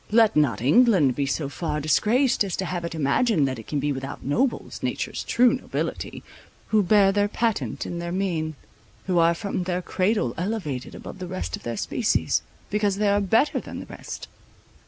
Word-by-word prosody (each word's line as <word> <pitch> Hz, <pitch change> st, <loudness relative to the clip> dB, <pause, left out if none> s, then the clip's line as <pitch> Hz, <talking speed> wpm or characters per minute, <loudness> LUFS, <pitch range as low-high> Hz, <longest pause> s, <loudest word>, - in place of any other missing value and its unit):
Let 220 Hz, 0 st, +4 dB
not 130 Hz, -8 st, +2 dB
England 175 Hz, -, +5 dB
be 140 Hz, -1 st, -1 dB
so 140 Hz, +1 st, -1 dB
far 150 Hz, +1 st, -3 dB
disgraced, 215 Hz, -, +2 dB
as 195 Hz, -3 st, -3 dB
to 190 Hz, -, -2 dB
have 175 Hz, -1 st, -3 dB
it 170 Hz, -1 st, -4 dB
imagined 155 Hz, -, +2 dB
that 130 Hz, -3 st, -3 dB
it 110 Hz, -, -11 dB
can 145 Hz, -, -1 dB
be 145 Hz, +1 st, 0 dB
without 135 Hz, -1 st, -6 dB
nobles, 240 Hz, -, -1 dB
nature's -, -, -3 dB
true 245 Hz, 0 st, +4 dB
nobility, 260 Hz, -, -4 dB, 0.5 s
who 215 Hz, -1 st, +4 dB
bear 195 Hz, 0 st, +5 dB
their 205 Hz, +1 st, +2 dB
patent 225 Hz, +1 st, -1 dB
in 170 Hz, -, -4 dB
their 170 Hz, 0 st, -4 dB
mien, 170 Hz, -5 st, -1 dB, 0.5 s
who 180 Hz, -2 st, +2 dB
are 170 Hz, 0 st, +4 dB
from 185 Hz, 0 st, -3 dB
their 180 Hz, 0 st, -1 dB
cradle 185 Hz, -, 0 dB
elevated 175 Hz, -, -3 dB
above 190 Hz, -, -9 dB
the 180 Hz, -, -5 dB
rest 85 Hz, -, -3 dB
of -, -, -12 dB
their 120 Hz, -1 st, -4 dB
species, -, -, +1 dB, 0.3 s
because 205 Hz, -1 st, +1 dB
they 205 Hz, 0 st, +1 dB
are 205 Hz, 0 st, +3 dB
better 225 Hz, +8 st, +2 dB
than -, -, -8 dB
the -, -, -7 dB
rest. -, -, -8 dB
180 Hz, 190 wpm, -25 LUFS, 145-210 Hz, 0.5 s, England